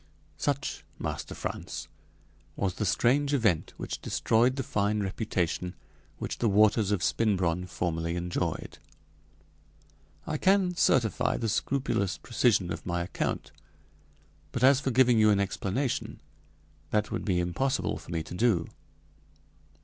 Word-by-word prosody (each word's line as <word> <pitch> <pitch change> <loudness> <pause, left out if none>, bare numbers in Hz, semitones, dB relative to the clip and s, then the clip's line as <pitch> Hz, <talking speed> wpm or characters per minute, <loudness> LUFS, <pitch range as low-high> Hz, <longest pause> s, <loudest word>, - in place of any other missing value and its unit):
Such, 140 -1 -1
Master - - -4
Frantz, - - -5 0.7
was 95 -2 -1
the 105 +3 -2
strange 140 +9 +2
event 110 - +1
which - - -5
destroyed 120 +3 +2
the 135 - -2
fine 105 -4 0
reputation 90 -3 -2 0.4
which - - -5
the 115 - +2
waters 105 0 +4
of 100 -4 0
Spinbronn 90 -5 +1
formerly 85 -1 -2
enjoyed. 90 0 -3 1.5
I 155 - -2
can 190 -2 +3
certify 125 - +2
the 115 - -2
scrupulous 100 -4 0
precision 110 -7 +1
of 80 - -7
my 85 -1 -1
account. 90 - -3 1.0
But - - -2
as 135 0 +7
for 135 - -1
giving 125 -2 +4
you 110 0 +6
an 100 -1 +4
explanation, 100 +6 -2 0.7
that 105 0 0
would - - -2
be 95 -4 +1
impossible 90 +10 -1
for - - -14
me 80 -2 -2
to 80 - -9
do. 90 -4 +2
105 Hz, 130 wpm, -29 LUFS, 90-125 Hz, 1.5 s, as